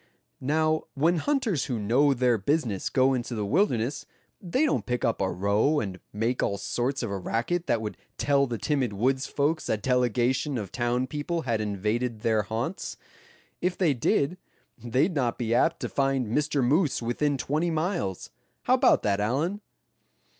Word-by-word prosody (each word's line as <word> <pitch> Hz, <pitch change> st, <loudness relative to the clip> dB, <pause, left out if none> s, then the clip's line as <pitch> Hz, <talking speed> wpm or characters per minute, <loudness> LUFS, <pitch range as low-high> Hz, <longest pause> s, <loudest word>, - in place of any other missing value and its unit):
Now, 155 Hz, +3 st, +1 dB
when 165 Hz, +5 st, +2 dB
hunters 230 Hz, -, 0 dB
who 125 Hz, -, -2 dB
know 130 Hz, +7 st, +3 dB
their 120 Hz, -2 st, +2 dB
business 115 Hz, -, 0 dB
go 130 Hz, +1 st, +3 dB
into 120 Hz, -1 st, -3 dB
the 105 Hz, -2 st, -2 dB
wilderness, 135 Hz, -, 0 dB, 0.3 s
they 225 Hz, -, +1 dB
don't 300 Hz, -, +1 dB
kick 125 Hz, -1 st, -1 dB
up 115 Hz, -, 0 dB
a 95 Hz, -, +1 dB
row, 100 Hz, -, +2 dB
and 95 Hz, -6 st, -4 dB
make 115 Hz, +4 st, -1 dB
all 100 Hz, -, 0 dB
sorts 125 Hz, +6 st, -2 dB
of 115 Hz, -, -3 dB
a 100 Hz, -, -2 dB
racket 120 Hz, -, -1 dB
that 110 Hz, -, +1 dB
would 105 Hz, -, -5 dB, 0.2 s
tell 140 Hz, -1 st, +2 dB
the 120 Hz, -2 st, -3 dB
timid 135 Hz, -4 st, 0 dB
woods' 130 Hz, +6 st, 0 dB
folks 150 Hz, +3 st, -1 dB
a 110 Hz, -, +2 dB
delegation 125 Hz, +3 st, +1 dB
of 100 Hz, -5 st, -5 dB
town 120 Hz, +1 st, 0 dB
people 150 Hz, +5 st, -3 dB
had 115 Hz, -4 st, 0 dB
invaded 110 Hz, +3 st, -2 dB
their 110 Hz, -1 st, +2 dB
haunts. 115 Hz, -, -4 dB, 0.6 s
If 180 Hz, 0 st, 0 dB
they 170 Hz, -6 st, +3 dB
did, 140 Hz, +7 st, 0 dB, 0.4 s
they'd 130 Hz, -, +1 dB
not 125 Hz, -6 st, 0 dB
be 115 Hz, -1 st, -1 dB
apt 120 Hz, -, +2 dB
to -, -, -1 dB
find 135 Hz, -2 st, +1 dB
Mr. 145 Hz, +4 st, 0 dB
Moose 145 Hz, +1 st, +2 dB
within 140 Hz, +5 st, 0 dB
twenty 155 Hz, +6 st, 0 dB
miles. 160 Hz, -, -2 dB, 0.3 s
How -, -, +3 dB
about -, -, +4 dB
that, 100 Hz, -1 st, +1 dB
Allan?" 145 Hz, -, -1 dB
130 Hz, 170 wpm, -27 LUFS, 115-150 Hz, 0.6 s, about